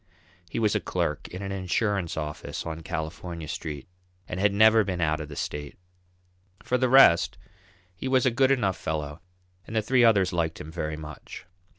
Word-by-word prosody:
He -, -, -5 dB
was 110 Hz, -2 st, +2 dB
a -, -, +2 dB
clerk 75 Hz, -, -2 dB
in 90 Hz, +2 st, -7 dB
an 95 Hz, -, -4 dB
insurance 95 Hz, -1 st, -1 dB
office 75 Hz, -1 st, -5 dB
on 80 Hz, 0 st, -5 dB
California 80 Hz, 0 st, -5 dB
Street, 75 Hz, -2 st, -5 dB, 0.4 s
and 90 Hz, -, -4 dB
had 100 Hz, +1 st, +3 dB
never 110 Hz, +2 st, +6 dB
been 95 Hz, -3 st, -3 dB
out 80 Hz, -1 st, +1 dB
of 75 Hz, -, -7 dB
the 75 Hz, -, -8 dB
state. 75 Hz, 0 st, -5 dB, 0.9 s
For 125 Hz, -, 0 dB
the 130 Hz, 0 st, +2 dB
rest 125 Hz, -10 st, +6 dB, 0.6 s
he 95 Hz, +9 st, -6 dB
was 130 Hz, -1 st, +3 dB
a 130 Hz, -, +4 dB
good 130 Hz, +3 st, +3 dB
enough 110 Hz, -9 st, +1 dB
fellow 75 Hz, 0 st, -4 dB, 0.5 s
and 110 Hz, -, -7 dB
the 110 Hz, -, +3 dB
three 125 Hz, +2 st, +3 dB
others 100 Hz, -5 st, +4 dB
liked 80 Hz, -2 st, -1 dB
him 80 Hz, -, -8 dB
very 80 Hz, -2 st, -3 dB
much. 75 Hz, -2 st, -9 dB
90 Hz, 185 wpm, -26 LUFS, 80-110 Hz, 0.9 s, never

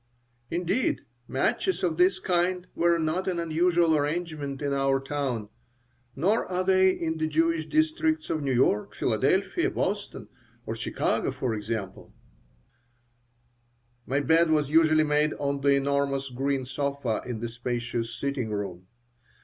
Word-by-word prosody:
Indeed, 180 Hz, +8 st, 0 dB, 0.3 s
matches 185 Hz, +7 st, 0 dB
of 165 Hz, -3 st, 0 dB
this 180 Hz, +1 st, +4 dB
kind 180 Hz, 0 st, 0 dB
were 170 Hz, 0 st, +3 dB
not 165 Hz, +4 st, -1 dB
an 180 Hz, -2 st, 0 dB
unusual 170 Hz, 0 st, +2 dB
arrangement 150 Hz, -2 st, -2 dB
in 145 Hz, -1 st, -1 dB
our 135 Hz, 0 st, +2 dB
town 135 Hz, -6 st, -3 dB, 0.7 s
(nor 195 Hz, +11 st, +2 dB
are 185 Hz, 0 st, -1 dB
they 190 Hz, 0 st, +4 dB
in 160 Hz, -3 st, -2 dB
the 155 Hz, -, +1 dB
Jewish 160 Hz, 0 st, +1 dB
districts 315 Hz, 0 st, +1 dB
of 155 Hz, -, -1 dB
New 140 Hz, -2 st, -1 dB
York, 120 Hz, -4 st, +1 dB
Philadelphia, -, -, +1 dB
Boston, -, -, -3 dB, 0.4 s
or -, -, -3 dB
Chicago, -, -, -1 dB
for 125 Hz, -3 st, -2 dB
example) 105 Hz, -2 st, -5 dB, 1.9 s
My 140 Hz, +2 st, +1 dB
bed 160 Hz, +3 st, +3 dB
was 150 Hz, -2 st, +1 dB
usually 155 Hz, -1 st, +5 dB
made 150 Hz, 0 st, +1 dB
on 140 Hz, -1 st, -2 dB
the 140 Hz, 0 st, +4 dB
enormous 140 Hz, -1 st, 0 dB
green 135 Hz, +1 st, -1 dB
sofa 140 Hz, -3 st, -2 dB
in 120 Hz, -3 st, -5 dB
the 120 Hz, -, -3 dB
spacious 120 Hz, 0 st, -3 dB
sitting 140 Hz, -5 st, -2 dB
room. 95 Hz, -4 st, -5 dB
150 Hz, 135 wpm, -27 LUFS, 135-170 Hz, 1.9 s, usually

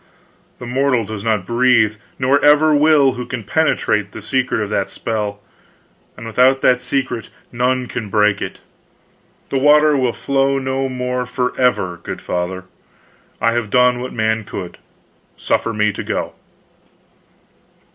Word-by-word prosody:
The 125 Hz, -, -9 dB
mortal 130 Hz, -1 st, +1 dB
does 105 Hz, -1 st, -6 dB
not 110 Hz, -5 st, 0 dB
breathe, 120 Hz, -2 st, +2 dB, 0.2 s
nor 135 Hz, +2 st, +2 dB
ever 150 Hz, +1 st, +5 dB
will, 145 Hz, -2 st, +4 dB
who 125 Hz, -1 st, -6 dB
can 125 Hz, -3 st, -5 dB
penetrate 105 Hz, -7 st, 0 dB
the 110 Hz, -, -8 dB
secret 130 Hz, +1 st, 0 dB
of 105 Hz, -1 st, -4 dB
that 100 Hz, -2 st, -1 dB
spell, 105 Hz, -3 st, -3 dB, 0.8 s
and 115 Hz, -, -9 dB
without 130 Hz, +4 st, +3 dB
that 125 Hz, -1 st, +3 dB
secret 125 Hz, -2 st, -3 dB, 0.2 s
none 125 Hz, +1 st, 0 dB
can 115 Hz, -3 st, -6 dB
break 105 Hz, -1 st, +2 dB
it. -, -, -6 dB, 0.9 s
The 135 Hz, -, +1 dB
water 150 Hz, +2 st, +5 dB
will 130 Hz, -3 st, +1 dB
flow 135 Hz, 0 st, 0 dB
no 135 Hz, 0 st, -2 dB
more 125 Hz, -1 st, -3 dB
forever, 125 Hz, -8 st, 0 dB
good -, -, -6 dB
Father. 90 Hz, +1 st, -3 dB, 0.8 s
I 115 Hz, -, +2 dB
have 120 Hz, -3 st, -2 dB
done 125 Hz, +1 st, +3 dB
what 130 Hz, -, -5 dB
man 110 Hz, 0 st, 0 dB
could. 95 Hz, -3 st, -8 dB, 0.6 s
Suffer 115 Hz, -, 0 dB
me 105 Hz, -1 st, 0 dB
to -, -, -5 dB
go." -, -, -3 dB
125 Hz, 145 wpm, -18 LUFS, 110-135 Hz, 0.9 s, ever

